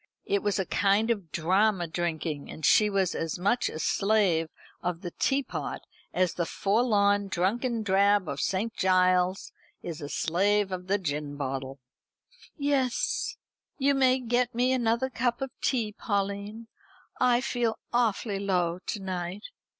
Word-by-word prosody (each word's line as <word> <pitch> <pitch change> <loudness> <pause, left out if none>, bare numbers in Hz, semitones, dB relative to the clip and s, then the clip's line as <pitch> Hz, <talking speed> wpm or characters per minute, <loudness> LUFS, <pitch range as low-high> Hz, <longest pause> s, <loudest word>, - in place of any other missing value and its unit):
It 200 0 +1
was 205 0 0
a 190 - 0
kind 205 +5 +2
of 195 -8 -3
drama 185 +3 +2
drinking, 160 -3 -3
and 155 - -5
she 210 +7 +5
was 195 -3 +1
as 165 -1 -3
much 205 +7 +1
a - - -7
slave 190 -3 +2 0.3
of 175 -1 -3
the 175 -3 -5
teapot 270 +8 -2 0.3
as 185 -1 +1
the 170 - -1
forlorn 205 -2 +2
drunken 220 +6 0
drab 200 -1 +3
of 140 -1 -3
St. 210 +4 -1
Giles's 185 0 +2 0.3
is 165 -3 -6
a 145 - -6
slave 195 +6 +1
of 180 0 -5
the 200 +2 +2
gin 150 -5 -3
bottle. 135 -1 -4 0.8
"Yes, 280 -4 0 0.4
you 280 0 +3
may 260 -1 +3
get 245 0 0
me 250 +2 +2
another 240 +1 +1
cup 240 0 0
of 270 -1 -4
tea, 230 -5 0
Pauline. 200 +2 -3 0.5
I 245 -1 +4
feel 240 -3 -1 0.2
awfully 220 -3 +1
low 180 -3 0
to 215 - -2
night." 185 +1 -4
200 Hz, 145 wpm, -28 LUFS, 180-230 Hz, 0.8 s, she